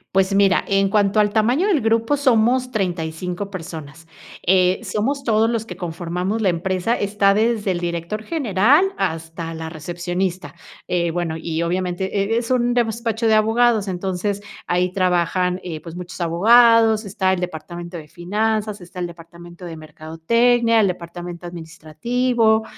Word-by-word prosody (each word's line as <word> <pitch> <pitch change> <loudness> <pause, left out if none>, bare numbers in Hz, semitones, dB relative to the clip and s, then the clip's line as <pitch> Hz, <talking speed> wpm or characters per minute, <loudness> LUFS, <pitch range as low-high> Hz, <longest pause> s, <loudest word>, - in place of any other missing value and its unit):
Pues 195 +1 +3
mira, 195 -2 +3
en 195 0 +2
cuanto 205 +1 +2
al 210 -1 +3
tamaño 245 - +2
del 340 - +2
grupo 225 +5 +2
somos 255 -1 +2
35 180 -1 -3
personas. 165 -3 -8 0.4
Eh, 185 0 +4
somos 265 +9 -2
todos 225 0 +3
los 225 -1 -2
que 180 - -8
conformamos 180 +4 -3
la 205 - +2
empresa, 185 +5 0
está 200 0 +2
desde 215 -2 +1
el 175 -1 -3
director 170 +5 -3
general 280 - +3
hasta 165 +1 -3
la 160 0 -6
recepcionista. 175 0 -4 0.3
Eh, 170 -2 0
bueno, 170 -2 -2
y 165 0 -3
obviamente 185 +4 -1
e - - +2
es 235 0 -2
un 245 -1 +2
despacho 230 -1 0
de 220 - +4
abogados, 220 -1 +3
entonces 190 +2 -2 0.3
ahí 180 +1 0
trabajan, 180 0 +1
eh, 160 -3 -5
pues, 165 +1 -9
muchos 180 0 -8
abogados, 225 +5 +5
está 190 -2 0
el 180 - -2
departamento 175 +1 -6
de 155 -2 -10
finanzas, 210 +5 -2
está 180 +1 -11
el 175 - -2
departamento 170 +1 -13
de 165 - -7
mercadotecnia, 225 +10 +1
el 205 - +4
departamento 175 0 -6
administrativo, 220 +8 0
190 Hz, 150 wpm, -21 LUFS, 175-220 Hz, 0.4 s, abogados